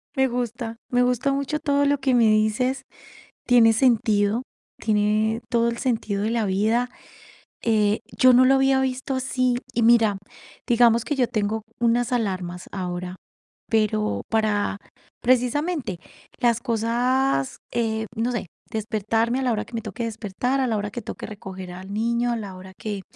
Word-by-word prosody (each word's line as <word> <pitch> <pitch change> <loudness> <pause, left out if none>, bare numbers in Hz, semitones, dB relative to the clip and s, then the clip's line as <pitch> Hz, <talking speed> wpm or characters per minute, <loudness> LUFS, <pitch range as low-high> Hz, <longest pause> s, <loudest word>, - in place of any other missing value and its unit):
Me 265 0 +3
gusta, 240 -2 -3 0.2
me 245 0 +3
gusta 250 +2 +1
mucho 280 +2 -1
todo 285 -2 +1
lo 285 0 +2
que 265 -1 0
me 240 -2 +5
dices. 215 +5 +2 0.6
Tiene 230 -2 +6
sentido, 220 -2 +2 0.4
tiene 215 +1 +1
todo 235 -1 +2
el 235 - -4
sentido 220 -5 -1
de 215 - 0
la 230 -1 0
vida. 220 +6 +1 0.7
Eh, 215 -2 +2
yo 255 - +6
no 255 +1 +6
lo 265 - +5
había 270 0 +3
visto 265 +1 -2
así, 255 -1 0 0.2
y 235 - 0
mira, 225 -3 +5 0.5
digamos 235 -1 +4
que 295 - -2
yo 255 -3 +2
tengo 215 0 -1 0.2
unas 240 0 +2
alarmas 185 -7 -2
ahora, 180 -1 -4 0.5
pero 105 - +1
para, 215 -2 +1 0.4
precisamente, 255 - +1 0.4
las 235 -2 +2
cosas, 240 - 0 0.2
eh, 220 -1 -1
no 235 +2 0
sé, 235 - -3 0.3
despertarme 225 +2 0
a - - -1
la 250 - +1
hora 215 -2 -1
que - - -18
me 230 - -2
toque 215 +2 -6
despertar, 230 +4 -2
a 260 - +1
la 225 -3 0
hora 205 0 -3
que 240 - -5
toque - - -7
recoger 190 -3 -8
al 185 +2 -9
niño, 235 +2 0
a - - 0
la 200 -4 -7
hora 190 +1 -11
que 205 -3 -4
230 Hz, 165 wpm, -24 LUFS, 210-250 Hz, 0.7 s, Tiene